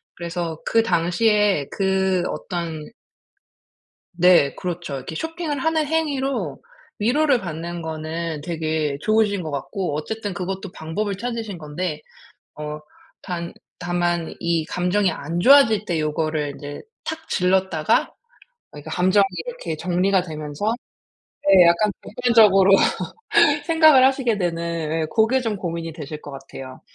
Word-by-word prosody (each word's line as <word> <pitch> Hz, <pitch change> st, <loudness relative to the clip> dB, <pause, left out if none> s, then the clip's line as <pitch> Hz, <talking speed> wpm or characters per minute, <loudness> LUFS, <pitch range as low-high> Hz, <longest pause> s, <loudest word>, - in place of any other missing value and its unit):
그래서 170 Hz, -2 st, -4 dB
그 225 Hz, 0 st, +3 dB
당시에 205 Hz, -3 st, +2 dB
그 190 Hz, -2 st, +1 dB
어떤 165 Hz, -3 st, -5 dB, 1.2 s
네 175 Hz, -5 st, +5 dB
그렇죠. 175 Hz, -5 st, -4 dB
이렇게 135 Hz, +5 st, -7 dB
쇼핑을 320 Hz, -, -3 dB
하는 320 Hz, 0 st, +1 dB
행위로 285 Hz, -4 st, -1 dB, 0.4 s
위로를 260 Hz, +4 st, +2 dB
받는 170 Hz, 0 st, -5 dB
거는 160 Hz, 0 st, -4 dB
되게 155 Hz, -2 st, -2 dB
좋으신 215 Hz, -2 st, +2 dB
것 155 Hz, -, -5 dB
같고 170 Hz, +4 st, -3 dB
어쨌든 205 Hz, +5 st, -4 dB
그것도 190 Hz, +1 st, -5 dB
방법을 195 Hz, +6 st, -3 dB
찾으신 225 Hz, -4 st, -4 dB
건데, 155 Hz, +1 st, -4 dB, 0.5 s
어 150 Hz, 0 st, -6 dB, 0.4 s
단 170 Hz, -2 st, -4 dB, 0.3 s
다만 175 Hz, -1 st, -1 dB
이 170 Hz, -2 st, 0 dB
감정이 180 Hz, +3 st, 0 dB
안 165 Hz, +2 st, -4 dB
좋아질 225 Hz, -2 st, +6 dB
때 170 Hz, -5 st, -1 dB
요거를 155 Hz, -1 st, -1 dB
이제 145 Hz, -1 st, -8 dB, 0.2 s
탁 320 Hz, 0 st, -6 dB
질렀다가 180 Hz, -3 st, +1 dB, 0.6 s
어 -, -, -10 dB
이게 145 Hz, +2 st, -10 dB
감정이 185 Hz, +4 st, +3 dB, 0.2 s
이렇게 480 Hz, -, -5 dB
정리가 180 Hz, +3 st, +1 dB
되면서 155 Hz, +4 st, -3 dB, 0.8 s
네 190 Hz, -2 st, +8 dB
약간 170 Hz, +5 st, +3 dB
객관적으로 210 Hz, -5 st, +5 dB, 0.9 s
생각을 315 Hz, -5 st, +6 dB
하시게 260 Hz, -5 st, +2 dB
되는 170 Hz, -2 st, -1 dB, 0.4 s
예 -, -, 0 dB
고게 235 Hz, +4 st, +3 dB
좀 225 Hz, -3 st, -2 dB
고민이 170 Hz, -3 st, -4 dB
되실 150 Hz, -1 st, -7 dB
것 145 Hz, -, -10 dB
같아요. 135 Hz, -1 st, -10 dB
180 Hz, 270 characters per minute, -22 LUFS, 160-215 Hz, 1.2 s, 네